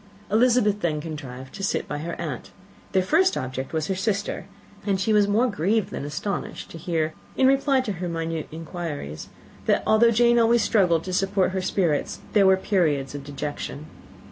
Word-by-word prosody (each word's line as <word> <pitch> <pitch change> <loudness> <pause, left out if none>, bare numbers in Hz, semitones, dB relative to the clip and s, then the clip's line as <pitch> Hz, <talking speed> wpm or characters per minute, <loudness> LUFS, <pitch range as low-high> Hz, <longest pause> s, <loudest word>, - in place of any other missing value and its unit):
Elizabeth 220 -2 +3
then 155 -3 0
contrived 135 -5 -7
to 195 - -8
sit 195 - -1
by 145 - -4
her 170 +3 -5
aunt. - - -5 0.4
Their 190 -1 +2
first 355 - +3
subject 130 +1 -4
was 160 -1 -1
her 190 - -1
sister; 200 +2 -2 0.4
and 195 -2 0
she 215 +3 +1
was 205 -1 +4
more 215 +5 +3
grieved 205 0 0
than - - -4
astonished 175 +7 -4
to 165 - -8
hear, 160 -1 -1 0.2
in 265 - +4
reply 270 0 +4
to 230 - -3
her 180 -2 -4
minute 165 -1 -3
inquiries, 160 - -6 0.4
that - - +2
though 225 +2 +5
Jane 235 +1 +4
always 230 0 +4
struggled 180 -7 +3
to 185 - -5
support 190 0 +1
her 190 0 -1
spirits, 180 -5 0 0.2
there 200 -2 +5
were 190 0 +6
periods 155 -9 0
of 145 -1 -6
dejection. 145 +1 -5
185 Hz, 180 wpm, -24 LUFS, 155-210 Hz, 0.4 s, were